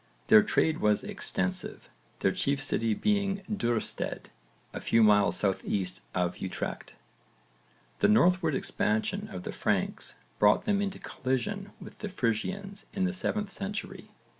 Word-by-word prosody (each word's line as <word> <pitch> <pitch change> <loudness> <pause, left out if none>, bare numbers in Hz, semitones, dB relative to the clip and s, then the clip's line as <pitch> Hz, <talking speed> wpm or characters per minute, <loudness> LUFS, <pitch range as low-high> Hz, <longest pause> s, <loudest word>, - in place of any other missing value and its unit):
Their 110 - +9
trade 160 +8 +1
was 105 -1 +2
extensive, 95 0 -3 0.3
their 95 - +3
chief 140 +7 -1
city 115 -6 +1
being 200 - 0
Duurstede 120 - -2 0.4
a - - -5
few 115 0 +3
miles 105 -1 +5
south 95 -2 +2
east 95 -3 -2
of 90 -1 0
Utrecht. 95 - -5 1.0
The - - +4
northward 180 -7 +4
expansion 110 -4 0
of 90 -1 -6
the - - -4
Franks - - -1 0.2
brought 105 - +4
them 205 -2 +2
into 195 -1 -2
collision 195 +11 -3
with - - -12
the 210 - -4
Frisians 190 - -2
in 195 - -1
the 185 - +1
7th 205 +2 -2
century. 200 +3 -5
145 Hz, 140 wpm, -29 LUFS, -, 1.0 s, Their